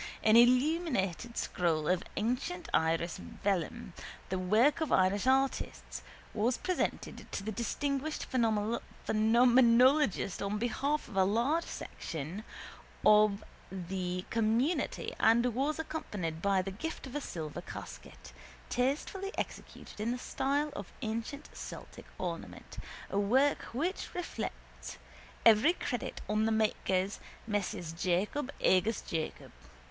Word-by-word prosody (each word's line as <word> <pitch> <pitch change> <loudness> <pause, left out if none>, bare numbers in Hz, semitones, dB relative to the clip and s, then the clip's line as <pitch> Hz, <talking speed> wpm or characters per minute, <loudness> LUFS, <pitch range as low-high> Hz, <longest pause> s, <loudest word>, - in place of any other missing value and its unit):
An 215 0 +5
illuminated 245 - +3
scroll 160 -4 0
of 180 0 +2 0.2
ancient 270 - -1
Irish 165 +1 +1 0.3
vellum, 200 +1 -1 0.4
the 185 - -1
work 220 - +3
of 315 - -1
Irish 190 +4 +3
artists, 270 +1 0 0.3
was 230 +4 +1
presented 365 -1 -3
to - - -3
the 220 - -3
distinguished 280 +6 -2
phenomenologist 235 +1 +3
on 200 +1 -1
behalf 275 +6 -1
of - - -11
a 190 - +5
large 240 - +1
section 165 +7 -6 0.6
of 210 -1 +5 0.3
the 185 -1 -3
community 230 +8 +1
and 235 +2 +4
was 280 +6 0
accompanied 205 - -4
by 195 -1 +2
the 195 - -4
gift 305 +13 -5
of 260 - -9
a 295 - -1
silver 155 - -5
casket, 60 0 -10 0.4
tastefully 295 +10 -1
executed - - -6
in 220 - 0
the 245 - -1
style 285 +4 -1
of - - -7
ancient 230 +5 -4
Celtic - - -9
ornament, 170 -3 -6 0.3
a 195 - +1
work 260 +8 +3
which 325 +10 -3
reflects 355 -1 -6 0.5
every 225 +9 +7
credit 245 -9 -4
on 215 +1 +1
the 225 - +2
makers, 200 -3 +1 0.3
Messrs 200 -6 -2
Jacob 190 +11 -1
agus 200 +5 +3
Jacob. 160 -1 -4
225 Hz, 120 wpm, -32 LUFS, 190-265 Hz, 0.6 s, every